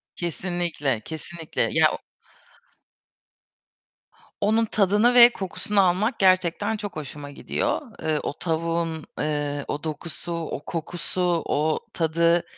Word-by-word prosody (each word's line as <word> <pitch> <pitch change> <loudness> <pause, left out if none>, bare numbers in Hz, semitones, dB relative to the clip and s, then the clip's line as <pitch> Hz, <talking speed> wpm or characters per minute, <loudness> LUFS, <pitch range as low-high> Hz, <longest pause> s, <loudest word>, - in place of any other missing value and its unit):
Kesinlikle, 170 - -2
kesinlikle 160 0 -5
ya, - - +5
o - - -5 2.4
onun 220 +2 +3
tadını 210 +3 +3
ve 240 -1 +10
kokusunu 200 +1 0
almak 210 +7 0
gerçekten 185 +3 +2
çok 205 -2 -6
hoşuma 145 -1 -7
gidiyor. - - -1 0.2
Eee, 155 -1 0
o - - -2
tavuğun, 165 -1 -2
eee, 145 -1 -1
o 145 +1 -4
dokusu, 160 +2 -4
o 165 -3 -4
kokusu, 170 +2 -2 0.2
o 155 +2 +1
tadı 170 +1 +2
170 Hz, 110 wpm, -24 LUFS, 155-190 Hz, 2.4 s, ve